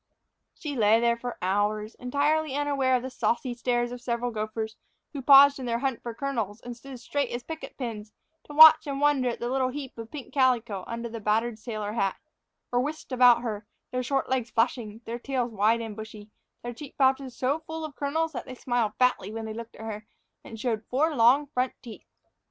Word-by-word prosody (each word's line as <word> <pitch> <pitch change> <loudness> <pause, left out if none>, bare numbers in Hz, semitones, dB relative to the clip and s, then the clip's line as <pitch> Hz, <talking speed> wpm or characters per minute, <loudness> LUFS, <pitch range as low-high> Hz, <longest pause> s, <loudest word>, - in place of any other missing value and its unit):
She 295 -3 -5
lay 220 -1 +4
there 235 0 +3
for 245 +1 -6
hours, 210 +3 0
entirely 285 +3 0
unaware 280 -3 +1
of 250 - -1
the 260 - -5
saucy 245 +1 -1
stares 240 0 -1
of 245 0 -7
several 240 0 -2
gophers 220 0 -4 0.4
who 280 - -4
paused 280 +1 +8
in 255 - -5
their 235 0 0
hunt 265 -1 -2
for 235 -2 -6
kernels 230 -6 -3
and 245 +1 -8
stood 260 +1 -10
straight 280 +2 -2
as 240 +1 -4
picket 320 +2 -8
pins 220 -5 -5 0.3
to 295 - -10
watch 315 0 +9
and 275 -1 -3
wonder 285 -3 +3
at 235 - -4
the 240 - -3
little 260 +1 +1
heap 270 0 -7
of 225 0 -7
pink 290 -4 -9
calico 240 -7 +1
under 235 0 -4
the 230 0 -7
battered 220 +2 0
sailor 215 -2 -4
hat, 195 -4 0 0.6
or 245 - +2
whisked 295 +3 -4
about 245 -2 +6
her, 210 -3 -4 0.2
their 255 - -1
short 270 +2 -1
legs 255 -3 -1
flashing, 225 -1 -1
their 235 +1 -5
tails 250 -2 -2
wide 220 +3 +2
and 220 -2 -6
bushy, 215 -1 -10 0.3
their 240 0 -5
cheek 275 +4 -11
pouches 265 -1 +1
so 275 +4 0
full 320 0 -6
of 295 -3 -9
kernels 315 +3 -1
that 245 -6 -6
they 255 - -7
smiled 240 -4 -1
fatly 250 -5 +2
when 225 0 -5
they 220 - -5
looked 230 +1 -8
at 220 - -9
her, 215 -1 -6 0.4
and 225 - -10
showed 225 -2 -1
four 300 +5 +1
long 255 +5 +5
front 255 -3 -1
teeth. 230 -3 -11
245 Hz, 210 wpm, -27 LUFS, 225-270 Hz, 0.6 s, watch